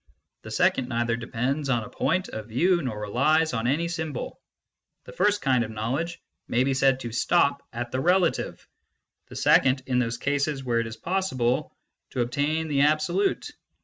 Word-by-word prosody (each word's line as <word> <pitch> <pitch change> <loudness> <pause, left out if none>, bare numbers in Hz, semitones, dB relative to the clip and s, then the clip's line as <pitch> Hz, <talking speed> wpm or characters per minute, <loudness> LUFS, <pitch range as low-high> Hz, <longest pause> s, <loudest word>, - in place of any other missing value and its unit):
The - - -10
second 130 -1 +1
neither 120 -1 0
depends 125 +5 -2
on 120 -4 +1
a - - -9
point 185 +3 0
of 110 -1 -7
view 170 +10 +2
nor 120 -7 -4
relies 145 +10 +2
on 115 0 -1
any 155 +6 +1
symbol. 160 -5 -5 0.6
The - - -11
first 205 +3 +1
kind 130 -3 +3
of 110 - -5
knowledge 130 +11 -3 0.3
may 120 +2 +2
be 135 0 +1
said 135 -1 +2
to 120 - -5
stop 140 +4 +2
at 120 0 -5
the 130 - -1
relative; 180 +3 +1 0.6
the - - -12
second, 130 0 +3
in 125 -1 +1
those 115 -1 -1
cases 140 +1 -1
where 120 -2 +1
it 115 - -2
is 110 0 -8
possible, 130 -8 -1 0.4
to 125 - -2
attain 145 +6 0
the 140 -2 +1
absolute." 155 +6 +1
135 Hz, 175 wpm, -26 LUFS, 120-160 Hz, 0.6 s, kind